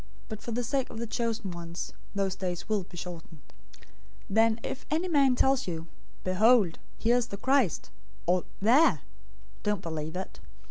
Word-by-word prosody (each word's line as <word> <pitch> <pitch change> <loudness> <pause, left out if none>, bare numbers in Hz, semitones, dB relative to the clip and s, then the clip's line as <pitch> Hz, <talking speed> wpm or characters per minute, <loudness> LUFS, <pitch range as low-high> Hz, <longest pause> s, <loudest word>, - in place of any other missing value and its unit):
But 215 -2 -6
for 235 - -5
the 245 +2 -1
sake 265 +2 0
of - - -8
the 235 - -2
chosen 230 -3 -2
ones, 170 0 -6 0.2
those 195 -1 0
days 180 -2 -3
will 215 -2 +1
be 175 - -13
shortened. 165 -3 -8 0.3
024:023 - - -19 0.5
"Then 225 +2 +4
if 265 - -4
any 325 +5 +1
man 280 -6 +4
tells 265 -1 +3
you, 165 -2 -3 0.4
'Behold, 200 -1 +4 0.2
here 235 +2 +3
is 245 - 0
the 200 - -6
Christ,' 260 - +2 0.3
or, 180 +1 +2 0.2
'There,' 230 - +5 0.6
don't 210 -2 0
believe 160 0 -4
it. 190 +1 -5
215 Hz, 170 wpm, -29 LUFS, 180-245 Hz, 0.6 s, There